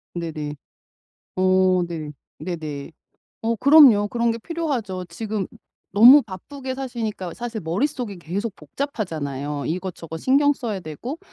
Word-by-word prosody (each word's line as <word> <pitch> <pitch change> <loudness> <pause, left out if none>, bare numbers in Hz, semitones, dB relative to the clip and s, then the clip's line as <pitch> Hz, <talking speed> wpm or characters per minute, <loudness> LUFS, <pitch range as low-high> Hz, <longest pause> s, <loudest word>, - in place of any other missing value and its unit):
네네. 155 -3 -4 0.8
어 185 -1 +4
네. 155 -3 -5 0.3
네네. 155 -4 -5 0.5
어 230 0 0
그럼요 260 -7 +7
그런 235 0 +1
게 230 - -2
필요하죠. 240 - -3
지금 205 +3 -4 0.4
너무 245 +8 +9
바쁘게 260 +7 -7
사시니까 225 -9 -4
사실 235 -2 -5
머릿속이 200 - -2
계속 195 +6 -4
복잡하잖아요. 150 - -4
이것저것 165 -2 -4
신경 285 - +4
써야 220 -8 -4
되고 205 - -6
200 Hz, 275 characters per minute, -23 LUFS, 170-240 Hz, 0.8 s, 너무